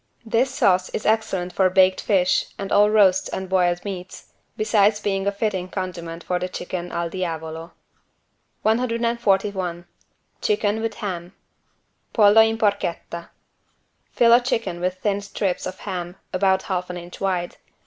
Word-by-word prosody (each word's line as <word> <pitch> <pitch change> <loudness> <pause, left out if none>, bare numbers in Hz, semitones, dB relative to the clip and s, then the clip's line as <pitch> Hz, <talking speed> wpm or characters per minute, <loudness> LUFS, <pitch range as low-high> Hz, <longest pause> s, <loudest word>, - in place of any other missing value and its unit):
This 230 +4 +2
sauce 185 -8 +2
is - - -5
excellent 195 -5 0
for 190 -1 +3
baked 185 0 +4
fish 185 -3 +2
and 195 0 -5
all 205 +1 +5
roasts 200 -3 +4
and 190 0 -4
boiled 180 -1 +1
meats, 185 -2 -7 0.2
besides 210 -1 +3
being 195 -2 -1
a - - +3
fitting 200 -3 -2
condiment 170 -3 -5
for 180 -1 -1
the 180 +1 -3
chicken 180 -1 -5
"al 170 0 -2
diavolo". 165 -2 -5 0.9
141 215 -6 0 0.6
CHICKEN 220 - +1
WITH 225 -1 -2
HAM 180 -3 -5 0.8
(Pollo 210 0 +7
in 225 0 +2
porchetta) 185 -5 -2 0.8
Fill 235 -1 +5
a 240 - +7
chicken 230 -8 -2
with 180 +1 -1
thin 200 +1 -1
strips 200 -2 -2
of 185 0 -6
ham, 175 -1 -5 0.2
about 190 0 +2
half 180 -2 -3
an 180 - -5
inch 175 0 -10
wide. 180 -3 -1
190 Hz, 145 wpm, -23 LUFS, 180-210 Hz, 0.9 s, Pollo